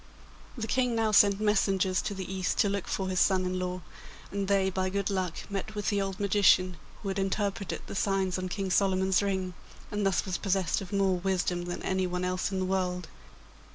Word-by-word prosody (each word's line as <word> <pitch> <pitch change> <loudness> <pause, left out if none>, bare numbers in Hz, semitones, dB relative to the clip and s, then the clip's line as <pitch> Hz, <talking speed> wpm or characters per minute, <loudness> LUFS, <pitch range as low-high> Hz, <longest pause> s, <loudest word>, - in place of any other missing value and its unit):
The 225 - -2
King 250 +1 +1
now 225 -1 +1
sent 200 -1 +5
messengers 195 -3 +2
to 210 -2 -4
the 190 -1 -5
East 185 -3 -1
to 205 - +3
look 200 -2 -2
for 190 - -2
his 185 -1 0
son 185 -2 +3
in 185 0 -1
law, 180 0 -3 0.5
and 200 -1 -2
they 195 -1 +2
by 185 0 -1
good 200 +1 -1
luck 185 -3 -1
met 205 +2 -4
with 210 - -1
the 205 -1 +1
old 195 -1 -3
magician 190 -3 +4 0.3
who 200 - -2
had 195 0 -2
interpreted 195 0 -2
the - - -7
signs 190 -2 0
on 185 0 -3
King 195 0 -3
Solomon's 190 0 +3
ring, 190 -2 -1 0.4
and 210 0 -1
thus 195 -2 +1
was 185 -2 -2
possessed 190 -3 0
of 190 - -8
more 195 -2 +2
wisdom 180 -1 0
than 175 0 -5
anyone 180 -1 -1
else 185 +2 -1
in 190 - -2
the 185 - 0
world. 180 -2 -1
190 Hz, 205 wpm, -29 LUFS, 185-200 Hz, 0.5 s, sent